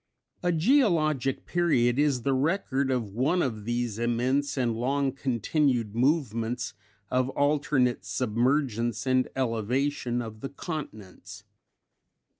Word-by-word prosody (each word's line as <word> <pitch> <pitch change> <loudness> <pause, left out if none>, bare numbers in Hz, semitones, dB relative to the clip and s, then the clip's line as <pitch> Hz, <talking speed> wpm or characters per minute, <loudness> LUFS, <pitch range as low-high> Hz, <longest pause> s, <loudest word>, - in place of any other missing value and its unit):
_ 175 - +2
A - - +4
geologic 160 - +2
period 135 -8 +2
is 140 -5 +2
the 135 - +1
record 140 -2 0
of 120 -6 -1
one 150 - +1
of 110 -6 -3
these 120 -2 -2
immense 125 +5 0
and 120 -3 +1
long 135 +3 0
continued 125 -2 0
movements 120 -3 0 0.4
of 130 0 +1
alternate 140 -5 +1
submergence 120 +2 0
and 130 -1 +2
elevation 125 +1 -1
of 110 -2 -6
the 135 - -5
continents. 105 - -8
130 Hz, 115 wpm, -27 LUFS, 115-145 Hz, 0.4 s, A